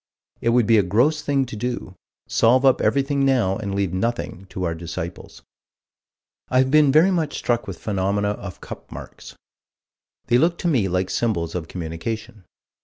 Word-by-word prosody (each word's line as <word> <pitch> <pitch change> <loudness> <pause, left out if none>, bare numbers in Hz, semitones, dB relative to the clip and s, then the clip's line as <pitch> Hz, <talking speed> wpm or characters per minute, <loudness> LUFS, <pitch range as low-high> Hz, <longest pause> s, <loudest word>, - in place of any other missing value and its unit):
It 115 - +1
would 120 -1 +3
be 115 0 +5
a - - +5
gross 125 - +2
thing 140 -2 +1
to 120 - -8
do: 120 -4 -4 0.3
solve 125 +4 +3
up 130 - +4
everything 140 0 +1
now 125 -8 +2
and 100 -3 -4
leave 100 -3 -1
nothing 100 -2 -3
to 90 0 -5
our 85 -2 0
disciples. 85 +1 -7 1.1
I 130 - +1
have 130 0 +3
been 150 -2 +5
very 160 +7 +5
much 160 -5 -1
struck 120 -3 -1
with 95 -4 -6
phenomena 100 0 -1
of 100 -3 -6
"cup - - -10
marks." - - -10 0.9
They 120 - +3
look 170 +4 +2
to - - -2
me 125 -12 +2
like 90 0 -1
symbols 85 -9 -1
of 85 -3 -4
communication. 95 +5 -6
110 Hz, 175 wpm, -22 LUFS, 95-130 Hz, 1.1 s, be